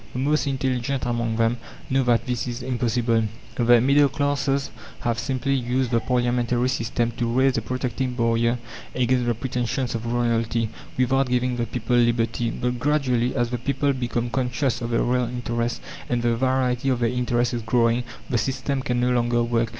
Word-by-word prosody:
The - - -5
most 150 +2 +1
intelligent 130 -1 -1
among 115 -2 -1
them 115 +1 +2 0.3
know 135 +1 +3
that 120 -1 +2
this 125 -1 -2
is 120 +1 -5
impossible. 120 -2 +1 0.3
The 120 0 +5
middle 140 +2 +4
classes 140 0 0 0.3
have 115 -2 -1
simply 130 +3 -1
used 125 -1 0
the 115 - +3
parliamentary 120 0 +1
system 120 -1 -1
to 120 -1 0
raise 130 +2 +3
a - - -6
protecting 125 +2 -2
barrier 115 0 +1 0.4
against 125 -1 +1
the 120 - +1
pretensions 125 +1 -2
of 115 0 -3
royalty, 115 -1 0 0.3
without 130 +1 +2
giving 125 0 +1
the 120 -1 -1
people 125 0 0
liberty. 120 -1 +1
But 125 +1 -2
gradually, 130 -3 +1
as 120 -2 0
the 125 - -2
people 140 +3 0
become 120 -2 -2
conscious 130 0 -1
of 115 - -3
their 115 - +1
real 125 0 +1
interests, 120 -1 -2 0.3
and 120 -1 0
the 120 -1 +2
variety 130 +1 +1
of 125 -2 +1
their 115 - +3
interests 120 0 0
is 120 - -2
growing, 115 +1 +2 0.2
the 120 - 0
system 135 +3 -1
can 125 -1 -1
no 125 +1 +2
longer 120 -1 +2
work. 115 -1 0
120 Hz, 180 wpm, -24 LUFS, 120-130 Hz, 0.4 s, The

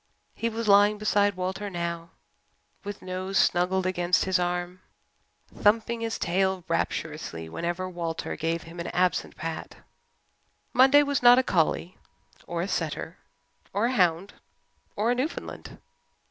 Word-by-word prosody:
He 230 - -2
was 230 0 -4
lying 205 +1 +6
beside 205 -1 +2
Walter 190 +3 -3
now 170 -2 -4 0.7
with 205 -1 -7
nose 185 +1 -3
snuggled 185 +1 +2
against 180 -1 +1
his 190 -1 +2
arm, 175 +1 -2 0.7
thumping 230 +2 +2
his 225 0 -2
tail 190 +1 0
rapturously 155 - -3
whenever 175 - -3
Walter 170 -2 -4
gave 165 +1 -2
him 165 +1 -11
an 170 - -4
absent 180 -1 0
pat. 165 0 -6 1.0
Monday 270 +3 +6
was 285 -2 0
not 245 0 +8
a 260 - +4
collie 175 -2 0 0.5
or 170 0 -2
a - - -3
setter - - -3 0.5
or 205 +3 +1
a 245 - +1
hound 180 -2 +1 0.6
or 220 +4 +1
a - - +4
Newfoundland. 260 +6 -5
185 Hz, 135 wpm, -27 LUFS, 170-210 Hz, 1.0 s, not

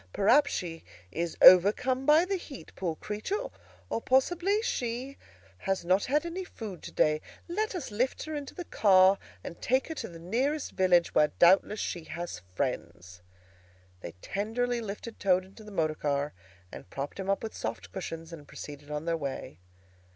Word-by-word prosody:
Perhaps 275 +9 +4
she 165 -3 -4 0.3
is 170 +5 -3
overcome 235 +9 +7
by 310 +3 +6
the 390 +1 -1
heat, 320 -7 -9
poor 170 -4 -2
creature; 300 - -3 0.4
or 230 - -2
possibly 350 - +2
she 250 - -2 0.4
has 190 - -2
not 185 +3 +3
had 295 +5 +1
any 350 +3 -4
food 210 - -8
to - - -8
day. 155 0 +2 0.3
Let 415 +4 -2
us 300 -10 -5
lift 245 +5 -1
her 310 - -6
into 290 -2 -6
the 355 - -6
car 190 -4 +5 0.2
and 170 - -8
take 260 +4 +1
her - - -2
to - - -5
the 170 - -11
nearest 255 - -1
village, 180 -2 +3
where 150 - +5
doubtless 195 +4 +5
she 170 -3 -3
has 170 - -6
friends." 90 - -4 0.8
They - - -8
tenderly 235 +4 -1
lifted 215 +2 -7
Toad 185 -1 +3
into 195 +3 -15
the 210 - -11
motor 160 -5 0
car 145 -1 -1 0.4
and - - -10
propped 140 - -5
him 195 0 -4
up 195 - +1
with 220 - -5
soft - - -5
cushions, 165 -3 -6
and 150 -3 -10
proceeded 145 0 -9
on 150 +1 -4
their 170 0 +1
way. 135 - -5
195 Hz, 175 wpm, -29 LUFS, 165-260 Hz, 0.8 s, overcome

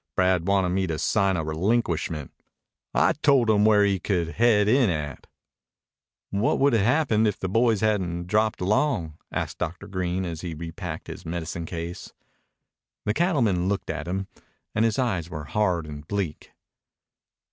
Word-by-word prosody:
Brad 90 -2 +2
wanted 95 -2 +2
me 95 +1 0
to 80 -2 -2
sign 100 +1 +1
a 80 - -1
relinquishment. 80 - -1 0.6
I - - +3
told 135 -7 +3
him 105 -1 +4
where 105 -1 +5
he 100 -2 +1
could 90 -3 -1
head 105 +1 +3
in 125 0 +4
at." 75 -5 -4 1.0
"What 100 +3 +1
would 140 -1 +3
have 115 - +3
happened 120 -3 +3
if 105 - -1
the 95 - -3
boys 115 +1 +2
hadn't 90 -5 0
dropped 110 +3 +1
along?" 90 - 0
asked - - -3
Dr. 90 0 -4
Green 95 0 -2
as 85 -3 -5
he 85 -3 -5
repacked 80 +1 -6
his - - -8
medicine 85 0 -4
case. 85 +1 -6 0.9
The 105 - +1
cattleman 115 - +1
looked 100 - -2
at - - -5
him, 95 +2 -2 0.5
and 110 +2 +2
his 115 -2 +1
eyes 100 -11 -1
were 75 -3 -6
hard 90 -2 0
and 75 -1 -9
bleak. 95 -6 -3
95 Hz, 160 wpm, -25 LUFS, 85-110 Hz, 1.0 s, where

